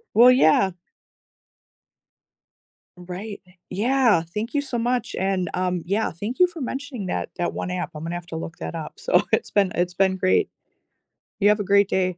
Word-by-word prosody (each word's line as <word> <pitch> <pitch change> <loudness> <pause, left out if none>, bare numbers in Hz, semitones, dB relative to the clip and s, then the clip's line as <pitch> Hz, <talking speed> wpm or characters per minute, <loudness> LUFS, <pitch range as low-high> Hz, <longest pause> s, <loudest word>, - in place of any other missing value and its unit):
Well, 240 +3 +8
yeah. 190 -5 +4 2.3
Right, 185 +4 -7
e 180 - -21 0.2
yeah, 235 -1 +3
thank 210 +8 -5
you 290 - +2
so 265 -4 -4
much, 240 +1 -1
and, 190 -2 0
um, 180 -2 -1
yeah, 205 +4 0
thank 210 +9 -5
you 360 - +7
for 350 -2 -10
mentioning 265 -4 -5
that - - -2
that 175 - -1
one 180 - -4
app, 180 -1 -3
Imma 160 +2 -5
have 175 0 -5
to 165 - -7
look 165 +1 -6
that - - -6
up. 155 -2 -6
So, 180 - +3
it's 220 - +1
been 200 -3 +2
it's 175 0 0
been 190 +1 +2
great. 185 - +2 0.9
You 205 - +4
have 210 - +3
a - - 0
great 200 0 +4
day. 185 -1 0
195 Hz, 180 wpm, -23 LUFS, 180-230 Hz, 2.3 s, Well